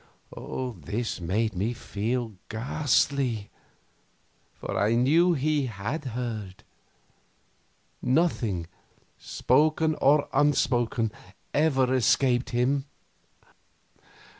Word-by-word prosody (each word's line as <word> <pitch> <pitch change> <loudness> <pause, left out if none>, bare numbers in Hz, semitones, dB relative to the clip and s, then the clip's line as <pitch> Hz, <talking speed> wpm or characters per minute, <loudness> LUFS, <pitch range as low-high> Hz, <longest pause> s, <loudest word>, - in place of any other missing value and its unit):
This 115 0 -3
made 105 +6 0
me 105 +7 -1
feel 115 +1 -3 0.2
ghastly, 125 -2 0 1.0
for - - -6
I 105 +3 +2
knew 160 +9 +4
he 145 -2 0
had 115 +8 -4
heard; 115 -6 -5 1.4
nothing, 125 - +1 0.5
spoken 155 +4 +2
or 145 +1 +4
unspoken, 120 -6 +2 0.4
ever 135 -4 +2
escaped 125 0 +2
him. 130 +3 +1
125 Hz, 75 wpm, -27 LUFS, 110-140 Hz, 1.4 s, knew